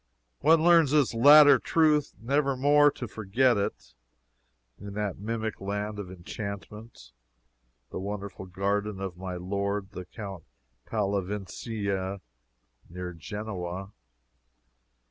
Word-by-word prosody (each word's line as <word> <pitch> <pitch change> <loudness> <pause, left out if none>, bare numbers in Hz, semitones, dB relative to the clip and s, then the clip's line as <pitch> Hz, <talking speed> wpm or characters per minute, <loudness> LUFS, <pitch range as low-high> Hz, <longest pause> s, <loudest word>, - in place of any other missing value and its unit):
One 160 +2 +4
learns 170 -4 +6
this 145 -3 +2
latter 145 +3 +8
truth 155 -1 +2
never 135 +3 0
more 145 +2 +5
to 125 -3 -6
forget 110 +5 +1
it, 100 -1 -4 0.9
in 100 -1 -8
that 105 -3 -3
mimic 110 0 -4
land 105 +1 -3
of 95 -3 -6
enchantment, 100 - -8 0.8
the - - -4
wonderful 100 -1 -6
garden 100 +2 -2
of 95 -2 -5
my 90 0 -6
lord 100 +2 -3
the 90 -3 -8
Count 95 -4 -8 0.4
Pallavicini, 100 -1 -3 0.7
near 90 +1 -6
Genoa. 95 +1 -6
105 Hz, 105 wpm, -28 LUFS, 95-120 Hz, 0.9 s, latter